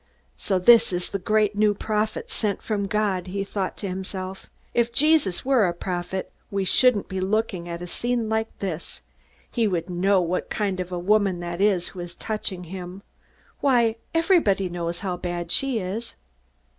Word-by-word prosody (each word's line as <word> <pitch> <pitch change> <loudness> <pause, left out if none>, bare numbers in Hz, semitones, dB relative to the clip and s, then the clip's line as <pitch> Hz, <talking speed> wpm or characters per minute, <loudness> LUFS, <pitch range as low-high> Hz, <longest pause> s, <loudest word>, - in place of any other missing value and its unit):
So 195 - 0
this 225 +4 +6
is 180 0 -2
the 200 - -2
great 210 +2 +2
new 210 0 +3
prophet, 215 +1 -2
sent 205 -3 -1
from 205 -2 -1
God! 195 -3 0
he 195 +2 -2
thought 195 -1 -3
to 200 - -4
himself. 190 0 -5 0.3
_If 235 0 +2
Jesus 290 - +3
were 260 -7 +4
a 175 - -2
prophet, 180 +1 -3 0.2
we 195 -1 -1
shouldn't 245 +1 +4
be 190 - -3
looking 190 -3 -1
at 170 +1 -5
a - - -4
scene 235 +5 -1
like 220 0 0
this. 180 -4 -5 0.5
He 230 -3 +2
would 180 -2 -2
know 190 +2 +3
what 180 +1 -1
kind 200 -3 -1
of 180 -1 -3
woman 185 +1 +2
that 175 +1 -4
is 195 -4 +2
who 185 - -10
is 175 0 -6
touching 210 -4 -4
him. 180 +2 -8 0.6
Why, 235 -5 +3
everybody 325 - +3
knows 170 0 -3
how 185 -3 -2
bad 175 -1 -4
she 270 +2 +1
is! 215 +4 -4
195 Hz, 170 wpm, -25 LUFS, 180-215 Hz, 0.6 s, this